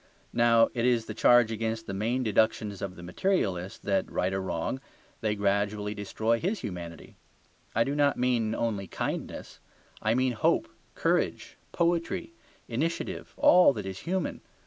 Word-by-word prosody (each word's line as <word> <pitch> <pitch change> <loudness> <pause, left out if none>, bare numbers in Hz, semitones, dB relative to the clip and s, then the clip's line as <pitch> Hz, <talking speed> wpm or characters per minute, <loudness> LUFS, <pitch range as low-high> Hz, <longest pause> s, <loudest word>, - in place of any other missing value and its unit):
Now 115 -1 +5
it 115 - -1
is 120 -2 +2
the - - -6
charge 120 -2 +5
against 110 0 -2
the 100 - -5
main 115 +6 0
deductions 110 -2 +1
of 95 -2 -4
the 85 - -11
materialist 95 - -1
that, - - 0
right 95 +1 0
or 95 - -1
wrong, 95 +8 -3 0.4
they 110 -1 0
gradually 100 +1 0
destroy 110 +3 -1
his 195 +4 -1
humanity; 85 -3 -7 0.6
I 115 - +4
do 140 - -2
not 145 -1 +2
mean 120 -3 +1
only 105 -4 -2
kindness, - - -5 0.4
I 110 +2 +2
mean 130 0 +2
hope, 110 - +2 0.3
courage, - - 0 0.2
poetry, 170 0 0 0.3
initiative, 150 +9 -3
all 180 -5 +6
that 105 -5 -5
is 95 -1 -5
human. 185 0 -2
110 Hz, 150 wpm, -28 LUFS, 100-125 Hz, 0.6 s, all